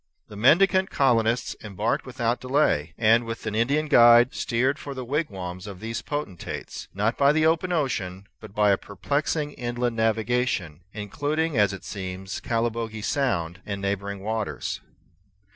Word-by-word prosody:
The 105 Hz, -, -10 dB
mendicant 190 Hz, -, +4 dB
colonists 115 Hz, -3 st, +2 dB
embarked 105 Hz, +4 st, -2 dB
without 120 Hz, -1 st, -1 dB
delay, 125 Hz, -, +1 dB
and, 115 Hz, +1 st, +4 dB
with 115 Hz, -1 st, -6 dB
an 110 Hz, -, -2 dB
Indian 140 Hz, +8 st, +1 dB
guide, 120 Hz, -2 st, +7 dB
steered 130 Hz, +4 st, 0 dB
for 140 Hz, -1 st, -7 dB
the 130 Hz, -1 st, -5 dB
wigwams 95 Hz, -, -3 dB
of 100 Hz, -3 st, -8 dB
these 115 Hz, +2 st, -4 dB
potentates, 145 Hz, -, -5 dB
not 105 Hz, +4 st, -1 dB
by 140 Hz, 0 st, +6 dB
the 155 Hz, +1 st, +2 dB
open 165 Hz, +3 st, +2 dB, 0.2 s
sea, 95 Hz, -5 st, -4 dB, 0.2 s
but 110 Hz, -3 st, -12 dB
by 105 Hz, -1 st, +4 dB
a 100 Hz, -, +3 dB
perplexing 145 Hz, -, -2 dB
inland 120 Hz, -2 st, -2 dB
navigation, 110 Hz, -7 st, 0 dB
including, 145 Hz, +10 st, -2 dB
as 105 Hz, -3 st, +4 dB
it 95 Hz, -1 st, -8 dB
seems, 95 Hz, -1 st, -5 dB
Calibogue 115 Hz, -2 st, -2 dB
Sound 90 Hz, -, -1 dB
and 100 Hz, -1 st, -4 dB
neighboring 100 Hz, 0 st, -3 dB
waters. 110 Hz, 0 st, -3 dB
115 Hz, 145 wpm, -25 LUFS, 100-135 Hz, 0.2 s, guide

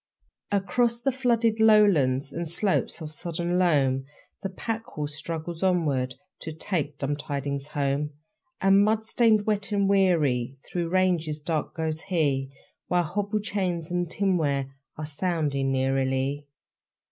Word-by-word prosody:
Across 235 Hz, +5 st, +1 dB
the 270 Hz, -, +1 dB
flooded 235 Hz, -3 st, +1 dB
lowlands 165 Hz, -12 st, +4 dB
And 170 Hz, -1 st, -4 dB
slopes 185 Hz, +1 st, 0 dB
of 155 Hz, -1 st, -6 dB
sodden 175 Hz, +2 st, -2 dB
loam 135 Hz, -7 st, +2 dB, 0.4 s
The 195 Hz, -, -3 dB
pack 225 Hz, +4 st, -4 dB
horse 150 Hz, -1 st, -5 dB
struggles 165 Hz, +2 st, -5 dB
onward, 150 Hz, -9 st, +1 dB, 0.2 s
To 160 Hz, -, -6 dB
take 155 Hz, -3 st, -3 dB
dumb 145 Hz, +1 st, -1 dB
tidings 140 Hz, -1 st, -4 dB
home. 145 Hz, 0 st, -1 dB, 0.5 s
And 195 Hz, +1 st, +5 dB
mud 220 Hz, +1 st, +1 dB
stained, 220 Hz, -2 st, +3 dB
wet, 205 Hz, -1 st, -1 dB
and 200 Hz, -1 st, +2 dB
weary, 150 Hz, -11 st, +2 dB
Through 170 Hz, -2 st, -3 dB
ranges 170 Hz, -5 st, +1 dB
dark 155 Hz, -1 st, -2 dB
goes 160 Hz, -1 st, -2 dB
he; 140 Hz, -7 st, 0 dB, 0.4 s
While 180 Hz, 0 st, +2 dB
hobble 205 Hz, +5 st, -2 dB
chains 185 Hz, -5 st, -2 dB
and 175 Hz, -1 st, -1 dB
tinware 150 Hz, -9 st, 0 dB, 0.2 s
Are 155 Hz, -, -4 dB
sounding 145 Hz, -4 st, -1 dB
eerily..... 135 Hz, +2 st, 0 dB
165 Hz, 135 wpm, -26 LUFS, 145-195 Hz, 0.5 s, And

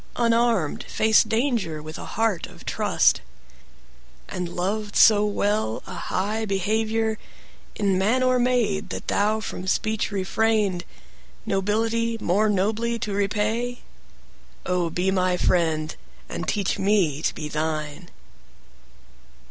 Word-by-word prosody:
Unarmed, 230 Hz, -8 st, +2 dB
faced 220 Hz, 0 st, +3 dB
danger 220 Hz, -, 0 dB
with 155 Hz, +1 st, -8 dB
a -, -, -7 dB
heart 225 Hz, -6 st, +1 dB
of -, -, -15 dB
trust? -, -, +2 dB, 1.1 s
And 180 Hz, -1 st, -4 dB
loved 200 Hz, +4 st, -3 dB
so 210 Hz, -1 st, +6 dB
well 205 Hz, -, -1 dB
a -, -, -8 dB
high 210 Hz, +4 st, -2 dB
behavior, 220 Hz, +3 st, 0 dB, 0.6 s
In 195 Hz, -3 st, +1 dB
man 230 Hz, +7 st, +2 dB
or 255 Hz, 0 st, +3 dB
maid, 240 Hz, -5 st, +1 dB
that -, -, -6 dB
thou 215 Hz, +2 st, +1 dB
from 190 Hz, -3 st, -6 dB
speech 215 Hz, +3 st, 0 dB
refrained, 200 Hz, -1 st, 0 dB, 0.6 s
Nobility 225 Hz, +3 st, 0 dB
more 210 Hz, +3 st, +2 dB
nobly 220 Hz, +4 st, 0 dB
to 210 Hz, -2 st, -4 dB
repay?O, 210 Hz, -4 st, -3 dB
be 180 Hz, +3 st, 0 dB
my 185 Hz, -1 st, +1 dB
friend, 160 Hz, -4 st, +1 dB, 0.3 s
and -, -, -5 dB
teach 200 Hz, -3 st, 0 dB
me 190 Hz, -8 st, +2 dB
to -, -, 0 dB
be 155 Hz, -, -5 dB
thine! 155 Hz, +1 st, -3 dB
205 Hz, 115 wpm, -24 LUFS, 180-225 Hz, 1.1 s, so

